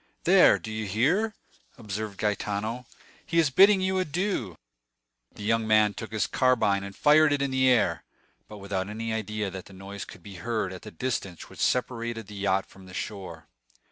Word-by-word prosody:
"There, - - +6
do 110 - -8
you 110 -1 -3
hear?" 170 - +1 0.4
observed 105 -2 -5
Gaetano; 105 +3 -2 0.4
"he 165 - -3
is 160 -4 +4
bidding 195 +6 +6
you 190 0 +1
adieu." 175 - -2 0.8
The 105 - -9
young 115 +1 +1
man 110 -1 +4
took 110 0 -7
his 110 -1 0
carbine 115 -7 +2
and 100 0 -8
fired 150 +1 +5
it 145 -1 +1
in 140 - -1
the 130 0 +3
air, 120 -5 +2 0.4
but 105 - -10
without 100 -1 -3
any 110 +1 -4
idea 105 -2 -3
that 95 0 -8
the 100 - -14
noise 100 +1 -8
could 90 - -13
be 100 -1 -10
heard 110 -5 -2
at 90 - -9
the - - -9
distance 95 -3 -4
which - - -14
separated 115 -3 -1
the 105 - -12
yacht 100 -1 0
from 95 -1 -16
the 90 - -11
shore. 95 -5 -6
110 Hz, 185 wpm, -27 LUFS, 100-130 Hz, 0.8 s, There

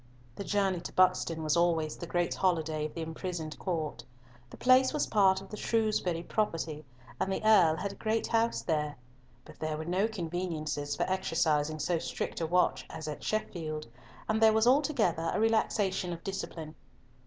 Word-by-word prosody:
The - - -5
journey 195 -3 +1
to - - -8
Buxton 180 -3 +2
was 155 -1 +2
always 165 -3 +2
the 170 - -7
great 175 0 0
holiday 160 -4 0
of - - -16
the 165 - -3
imprisoned 160 -1 -5
Court. 165 -8 -3 0.5
The - - -12
place 255 +1 +5
was 300 - +1
part 190 -2 +3
of 195 - -12
the 210 - -7
Shrewsbury 210 -8 0
property, 165 -7 -2 0.4
and 190 - 0
the 190 - -2
Earl 185 -8 +6
had 200 +4 -3
a - - -10
great 220 +1 0
house 230 0 +1
there, 150 -3 -1 0.5
but - - -14
there 155 -1 -2
were 155 - -5
no 185 +5 +1
conveniences 165 -7 -3
for - - 0
exercising 160 -5 0
so 170 +2 0
strict - - -4
a 165 - 0
watch 180 +2 +2
as 155 -1 -7
at 150 - -6
Sheffield, 160 -7 -3 0.4
and 220 +1 0
there 220 -1 +7
was 220 +1 +3
altogether 245 - +2
a - - +1
relaxation 210 -4 +1
of 170 - -9
discipline. 165 -5 -5
175 Hz, 175 wpm, -30 LUFS, 160-210 Hz, 0.5 s, there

